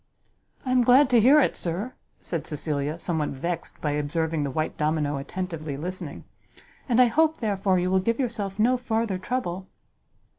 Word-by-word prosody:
"I 255 - -1
am 255 -1 +4
glad 255 +3 +5
to 240 - +6
hear 275 +7 +7
it, 290 - +2
sir," 185 +9 -3 0.3
said 165 -3 -4
Cecilia, 150 0 -2
somewhat 160 -3 -1
vexed 170 +5 -4
by 150 - 0
observing 155 +2 -1
the 140 - -1
white 155 +4 -2
domino 150 -1 0
attentively 155 -1 -5
listening; 180 +5 -6 0.7
"and 240 0 +3
I 250 - +8
hope, 315 +7 +2
therefore, 200 -4 +1
you 180 +1 0
will 190 - +4
give 230 +6 0
yourself 215 -6 -2
no 245 +4 +3
farther 225 -5 -1
trouble." 190 -5 -3
185 Hz, 170 wpm, -25 LUFS, 155-235 Hz, 0.7 s, I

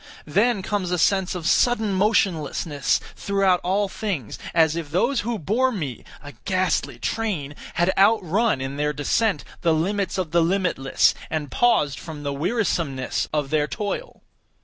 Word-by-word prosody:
Then 205 +6 +2
comes 195 -2 -2
a 180 - 0
sense 190 +2 +2
of 170 -2 -3
sudden 220 +1 +2
motionlessness 165 -7 +1 0.2
throughout 195 -2 +2
all 200 +3 +1
things; 190 - -4
as 160 -1 +3
if 165 -3 -4
those 235 - +1
who 235 +1 -2
bore 230 - +1
me 150 - -5 0.2
(a 145 - -9
ghastly 185 -2 0
train!) 185 -11 -2 0.2
had 175 +3 +2
outrun, 200 - +3
in 135 +1 -4
their 150 0 0
descent, 200 +9 0 0.2
the 165 -2 +3
limits 195 +3 -1
of 180 -5 -2
the 170 0 +4
limitless, 170 -6 +2 0.2
and 150 -3 -3
paused 150 - +2
from 155 -3 -8
the 140 -1 -2
wearisomeness 160 - -1
of 150 -3 -1
their 150 -1 +2
toil. 215 - -5
180 Hz, 150 wpm, -23 LUFS, 150-205 Hz, 0.2 s, the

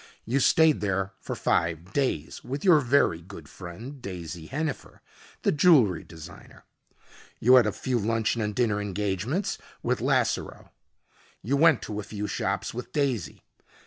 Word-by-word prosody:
You 130 +4 +1
stayed 160 +3 +4
there 95 -1 -1
for - - -5
five 85 +3 -1
days, 130 - -2
with 135 +6 -5
your 175 -5 +7
very 130 - +2
good 85 -4 -11
friend, 110 - -9
Daisy 85 -6 -7
Hennifer, 150 +1 -4 0.4
the - - +3
jewelry 145 - +4
designer. 80 -2 -13 0.8
You 125 +3 +5
had 125 -4 +7
a - - +1
few 125 +4 -2
luncheon 115 +1 0
and 105 -1 -2
dinner 110 -4 +1
engagements 105 - -2 0.2
with - - 0
Lasseroe. - - 0 0.7
You 125 +8 0
went 155 -2 +4
to 105 -1 -5
a - - -4
few 105 0 -5
shops 100 -2 -2
with 125 +1 -7
Daisy. 130 - -2
110 Hz, 145 wpm, -26 LUFS, 95-135 Hz, 0.8 s, your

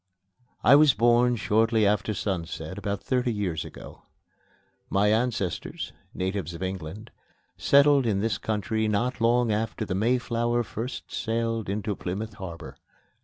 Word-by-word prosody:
I 135 - +8
was 145 -3 +6
born 120 +1 +4
shortly 110 0 +2
after 105 +1 +1
sunset 90 -2 -4
about 100 0 -3
thirty 125 -2 0
years 95 -8 -2
ago. - - -11 0.9
My 105 +2 +3
ancestors, 110 -6 -2 0.2
natives 95 -3 -3
of 85 - -6
England, 95 +4 -6 0.4
settled 140 -2 +4
in 100 -3 +1
this 110 +2 -1
country 110 +1 -1
not 115 +4 -1
long 120 0 +3
after 110 +1 -2
the 100 - -3
Mayflower 120 +2 +1
first 115 +3 -6
sailed 115 -1 -1
into 105 +1 -2
Plymouth 100 +5 -4
Harbor. 90 -4 -8
110 Hz, 130 wpm, -26 LUFS, 100-120 Hz, 0.9 s, I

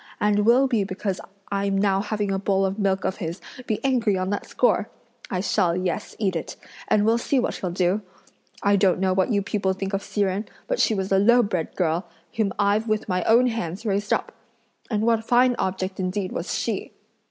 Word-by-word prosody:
and 210 0 +2
will 250 +3 +6
be 230 -6 +1
because 195 0 -3 0.3
I'm 200 0 0
now 195 -1 +2
having 210 -1 -2
a 195 - 0
bowl 195 0 +1
of 195 +2 -2
milk 195 -1 +1
of 190 - -1
his 170 -2 -4 0.3
be 215 -3 0
angry 235 -7 +2
on 185 +1 -1
that 205 - -3
score! 225 -3 +1 0.4
I 185 - -1
shall, 185 -3 +1
yes, 185 -2 -3
eat 195 -4 0
it, 165 - -4 0.3
and 210 0 +3
we'll 230 +2 +3
see 275 - 0
what 245 - -1
he'll 185 - -3
do! 180 +3 +1 0.6
I 200 0 +4
don't 185 -2 +3
know 190 0 +2
what 190 +5 +1
you 200 -2 +1
people 195 -1 0
think 195 +1 -5
of 195 - 0
Hsi 205 - -3
Jen, 195 +2 0 0.2
but - - -1
she 220 - +3
was 190 0 -3
a 195 - +4
lowbred 205 -6 +2
girl, 170 0 0 0.3
whom 215 -3 +1
I've 205 +2 +2
with 215 0 -1
my 180 -2 0
own 235 +3 +5
hands 225 -4 -3
raised 205 0 -1
up! - - 0 0.6
and 215 -3 0
what 225 -1 +2
fine 245 +2 +4
object 190 0 -2
indeed 185 +1 -2
was - - -3
she!" - - -3
200 Hz, 210 wpm, -24 LUFS, 190-215 Hz, 0.6 s, will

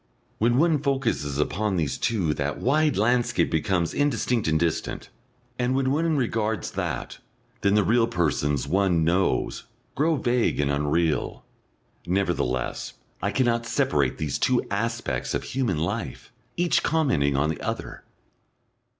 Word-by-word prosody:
When 120 +2 +3
one 160 0 +3
focuses 130 - -1
upon 95 +7 0
these 75 -6 0
two 95 -10 0
that 75 0 -2
wide 150 +1 +2
landscape 120 +3 +2
becomes 85 +1 0
indistinct 125 - 0
and 80 0 +2
distant, 85 -1 -2 0.5
and 125 +1 +1
when 135 -1 +1
one 160 +1 +1
regards 110 -5 -1
that - - -4 0.4
then 100 0 +3
the 105 - +4
real 115 +3 +3
persons 75 - 0
one 90 0 +2
knows 90 +4 0 0.3
grow 160 +3 +2
vague 120 - +1
and 70 -1 +1
unreal. 75 +3 0 0.6
Nevertheless, 85 -10 -1 0.3
I - - 0
cannot 120 -3 +1
separate 70 - +1
these 75 -3 -2
two - - +2
aspects - - -2
of - - -2
human 130 - -1
life, 100 +8 -4 0.3
each 175 0 +2
commenting 90 - +1
on 75 +3 +2
the - - -6
other. - - -5
105 Hz, 135 wpm, -25 LUFS, 80-125 Hz, 0.6 s, the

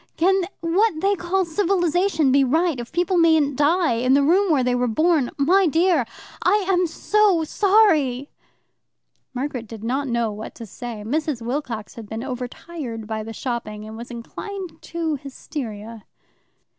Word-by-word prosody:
Can 380 +2 +3 0.2
what 340 +2 +2
they 395 +4 +2
call 375 0 0
civilization 350 -3 +1
be 275 +1 +5
right, 315 +2 +1
if 240 - -7
people 350 +2 +1
mayn't 320 -4 +4
die 315 +4 +3
in 255 +3 +2
the 280 - +4
room 365 +5 +3
where 275 -4 +3
they 250 0 +1
were 245 0 +1
born? 310 +2 +2
My 360 +7 +4
dear, 330 -5 +2 0.3
I 400 +2 +2
am 365 -2 +2
so 400 0 +2
sorry 310 - +2 0.5
" - - -50
Margaret 250 -3 -3
did 220 -1 -9
not 265 +5 -1
know 235 -2 0
what 210 +1 -8
to 230 - -8
say. 225 0 -7
Mrs. 290 -1 -2
Wilcox 240 -4 -4
had 220 -3 -10
been 220 +1 -4
overtired 250 -1 -6
by 220 0 -3
the 220 +1 -7
shopping, 215 -3 -5
and 220 - -8
was 235 +1 -8
inclined 350 - -7
to 325 -3 -3
hysteria. 230 -6 -7
290 Hz, 160 wpm, -22 LUFS, 235-350 Hz, 0.5 s, be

